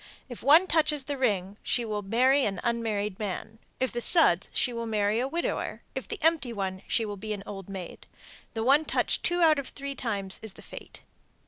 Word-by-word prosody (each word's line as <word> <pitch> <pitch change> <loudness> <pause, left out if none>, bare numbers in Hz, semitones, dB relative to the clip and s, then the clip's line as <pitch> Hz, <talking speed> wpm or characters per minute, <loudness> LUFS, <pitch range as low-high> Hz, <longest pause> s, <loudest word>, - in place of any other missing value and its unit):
If 245 - -8
one 310 +7 +6
touches 305 -5 +2
the 285 +1 -3
ring, 200 -6 -1
she 240 - 0
will 210 -2 -3
marry 255 +7 +3
an 195 -5 -1
unmarried 220 -4 -1
man; 210 +2 -5 0.2
if 260 - 0
the 240 - -3
suds, 230 - +5
she 245 - +1
will 230 0 -4
marry 210 0 +1
a 255 - 0
widower; 335 +5 -3
if - - -5
the 440 - -4
empty 320 -6 +2
one, 190 -3 -3
she 225 - +1
will 205 -1 -5
be 215 +2 -4
an 200 -1 -6
old 195 -2 -8
maid. 190 -3 -8 0.5
The 225 - -1
one 280 +5 +5
touched - - 0
two 350 0 +1
out 310 -3 +5
of 275 - -5
three 280 0 -6
times 200 -7 -3
is 220 -3 -6
the - - -13
fate. - - -11
230 Hz, 210 wpm, -28 LUFS, 205-275 Hz, 0.5 s, one